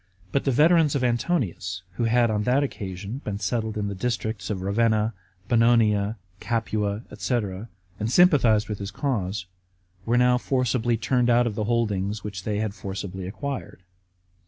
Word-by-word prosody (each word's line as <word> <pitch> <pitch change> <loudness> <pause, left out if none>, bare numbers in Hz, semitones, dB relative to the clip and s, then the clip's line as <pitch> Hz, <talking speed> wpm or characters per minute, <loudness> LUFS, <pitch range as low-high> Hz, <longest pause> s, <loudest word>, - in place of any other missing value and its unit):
But 140 - 0
the 135 - +3
veterans 155 +2 +4
of 135 - 0
Antonius, 120 - -1
who 115 +6 -2
had 120 0 +3
on 105 -1 0
that 125 +6 +2
occasion 100 0 -5
been 100 -1 -3
settled 110 +1 -2
in 105 -1 -1
the 100 - -3
districts 110 -2 -3
of 95 -3 -3
Ravenna, 110 +2 +2 0.3
Bononia, 115 -3 +3 0.2
Capua, 110 -2 -1
&c., 125 - -1 0.6
and 110 +2 -1
sympathized 125 -11 +5
with 105 -2 -4
his 100 -1 -4
cause, 105 -6 -2 0.6
were 120 +4 +1
now 125 0 +4
forcibly 125 -3 +1
turned 125 +2 +1
out 120 0 +4
of 115 - -1
the 105 0 -2
holdings 105 -3 0
which 100 -3 -6
they 105 -1 -1
had 105 -1 -1
forcibly 95 -2 -6
acquired. 130 -2 -6
110 Hz, 160 wpm, -25 LUFS, 100-125 Hz, 0.6 s, sympathized